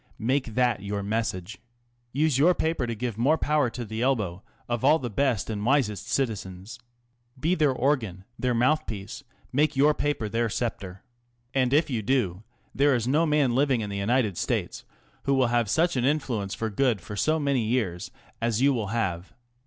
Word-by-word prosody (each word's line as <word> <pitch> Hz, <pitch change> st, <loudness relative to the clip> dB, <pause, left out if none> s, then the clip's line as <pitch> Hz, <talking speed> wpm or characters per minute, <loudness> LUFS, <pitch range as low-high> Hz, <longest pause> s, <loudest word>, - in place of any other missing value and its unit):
Make 125 Hz, -1 st, -1 dB
that 125 Hz, -5 st, +2 dB
your 100 Hz, 0 st, -3 dB
message. 100 Hz, -2 st, -3 dB, 0.5 s
Use 145 Hz, 0 st, +1 dB
your 175 Hz, +5 st, +5 dB
paper 160 Hz, -6 st, -1 dB
to 115 Hz, -, -3 dB
give 115 Hz, -1 st, -4 dB
more 145 Hz, +7 st, +3 dB
power 150 Hz, -5 st, +1 dB
to 120 Hz, +1 st, -6 dB
the 110 Hz, +1 st, -5 dB
elbow 105 Hz, -9 st, 0 dB, 0.3 s
of 120 Hz, -1 st, -2 dB
all 155 Hz, -, +6 dB
the 125 Hz, -6 st, -5 dB
best 125 Hz, -2 st, 0 dB
and 105 Hz, -2 st, -3 dB
wisest 120 Hz, -5 st, +1 dB
citizens. 105 Hz, -3 st, -3 dB, 0.6 s
Be 160 Hz, +6 st, +1 dB
their 155 Hz, -6 st, +3 dB
organ, 120 Hz, -9 st, -1 dB, 0.2 s
their 125 Hz, -1 st, 0 dB
mouth 150 Hz, +7 st, +2 dB
piece, 110 Hz, +5 st, -6 dB, 0.3 s
make 150 Hz, +2 st, +2 dB
your 145 Hz, +3 st, +4 dB
paper 145 Hz, -7 st, -1 dB
their 115 Hz, +2 st, 0 dB
sceptre. 100 Hz, -5 st, -4 dB, 0.5 s
And 130 Hz, -2 st, +2 dB
if 150 Hz, +1 st, +3 dB
you 115 Hz, -3 st, -1 dB
do, 105 Hz, -7 st, 0 dB, 0.3 s
there 140 Hz, 0 st, +3 dB
is 120 Hz, -1 st, -1 dB
no 155 Hz, +5 st, +3 dB
man 150 Hz, -5 st, +2 dB
living 135 Hz, -2 st, +2 dB
in 105 Hz, -1 st, -4 dB
the 100 Hz, -, -3 dB
United 105 Hz, -2 st, +1 dB
States -, -, -2 dB, 0.4 s
who 140 Hz, -, +2 dB
will 130 Hz, -3 st, +3 dB
have 120 Hz, -3 st, +2 dB
such 170 Hz, +5 st, +2 dB
an 125 Hz, -, 0 dB
influence 125 Hz, -8 st, -1 dB
for 110 Hz, -1 st, -3 dB
good 120 Hz, 0 st, +1 dB
for 105 Hz, +4 st, -8 dB
so 155 Hz, +10 st, +2 dB
many 140 Hz, -4 st, +1 dB
years 110 Hz, -7 st, -1 dB, 0.3 s
as 115 Hz, -1 st, 0 dB
you 140 Hz, +2 st, +4 dB
will 110 Hz, -5 st, -2 dB
have. 95 Hz, -5 st, -2 dB
120 Hz, 185 wpm, -26 LUFS, 105-140 Hz, 0.6 s, all